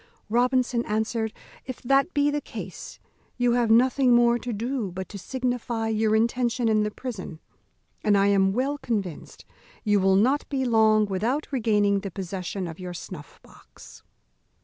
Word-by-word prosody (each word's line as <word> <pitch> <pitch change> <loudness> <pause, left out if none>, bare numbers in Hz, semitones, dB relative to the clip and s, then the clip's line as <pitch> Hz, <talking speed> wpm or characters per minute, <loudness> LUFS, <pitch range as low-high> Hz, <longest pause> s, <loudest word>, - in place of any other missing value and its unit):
Robinson 245 +1 +2
answered, 220 +1 -1 0.4
"If 255 - -6
that 275 +6 +3
be 290 0 +3
the 295 0 -1
case, - - -9 0.4
you 245 -1 +2
have 240 -1 +2
nothing 250 +2 +4
more 240 0 +4
to 245 - -5
do 230 -1 -3
but 190 +1 -6
to 200 - -8
signify 245 -1 -2
your 220 0 +1
intention 235 +1 +1
in 215 -1 +3
the 210 - 0
prison, 210 -8 -7 0.6
and 205 -1 +4
I 195 - +3
am 195 -1 +3
well 270 +7 -1
convinced 205 - -4 0.4
you 210 -2 +3
will 190 0 +3
not 255 +9 +2
be 265 -2 -1
long 220 -2 +4
without 225 +11 -2
regaining 210 -5 +2
the 195 - -5
possession 185 0 -5
of 165 +1 -8
your 180 -1 -6
snuff 165 -4 -10
box." - - -16
225 Hz, 160 wpm, -25 LUFS, 200-250 Hz, 0.6 s, nothing